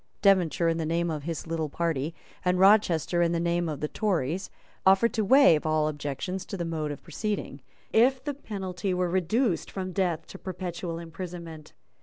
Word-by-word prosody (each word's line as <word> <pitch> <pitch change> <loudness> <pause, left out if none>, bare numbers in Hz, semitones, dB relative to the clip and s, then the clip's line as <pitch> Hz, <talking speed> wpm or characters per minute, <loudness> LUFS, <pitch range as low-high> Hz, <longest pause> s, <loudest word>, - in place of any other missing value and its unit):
Devonshire, 180 -4 +4
in 165 0 +1
the - - -1
name 170 +1 0
of 150 -2 -4
his 165 -1 -4
little 160 -2 -2
party, 160 -1 -2 0.3
and 180 0 +2
Rochester, 185 -4 +4
in 170 0 +2
the 170 - 0
name 170 0 0
of 150 -3 -5
the 150 - 0
Tories, 180 -2 -1 0.3
offered 195 +5 +5
to 220 - +1
waive 235 - +6
all 155 -1 +1
objections 150 +5 -4
to 195 - -5
the 170 - -2
mode 160 -2 -2
of 145 - -7
proceeding, 170 -4 -4 0.3
if 255 +3 +4
the 290 - -2
penalty 190 -7 -4
were 180 -1 0
reduced 190 +3 +1
from 185 -1 -4
death 175 -4 0
to 195 - -11
perpetual 180 -2 -5
imprisonment. 170 -2 -8
175 Hz, 180 wpm, -27 LUFS, 160-190 Hz, 0.3 s, waive